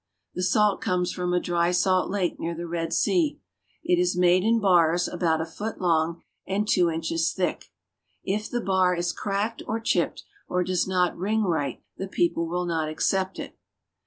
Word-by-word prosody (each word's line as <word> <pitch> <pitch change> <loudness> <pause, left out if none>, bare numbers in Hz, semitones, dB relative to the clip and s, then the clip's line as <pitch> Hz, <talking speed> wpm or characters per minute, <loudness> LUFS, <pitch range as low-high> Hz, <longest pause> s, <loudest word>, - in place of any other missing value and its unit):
The 180 - -4
salt 205 +2 +2
comes 180 -1 0
from 180 -1 -2
a 180 - +2
dry 175 -1 +1
salt 185 +1 +2
lake 190 -3 -1
near 170 0 -3
the 170 +1 -5
Red 165 -1 -3
Sea. 310 - +1 0.4
It 180 -1 +2
is 180 0 +1
made 180 +1 +4
in 230 +2 +3
bars 175 -4 +3
about 165 -3 0
a - - -2
foot 210 +7 -6
long 170 -1 +1 0.2
and 205 +2 -1
two 180 -4 +3
inches 165 0 -1
thick. 185 -2 -2 0.6
If 210 +2 -2
the 240 - -2
bar 185 -3 +2
is 175 0 -1
cracked 205 +3 -2
or 220 +1 -1
chipped 225 - 0 0.2
or 180 0 0
does 185 0 0
not 180 -1 +1
ring 215 +4 0
right, 160 -7 -1
the 195 - -4
people 190 - 0
will 180 +2 -2
not 160 -3 -1
accept 190 +4 -1
it. - - -8
180 Hz, 185 wpm, -25 LUFS, 170-195 Hz, 0.6 s, made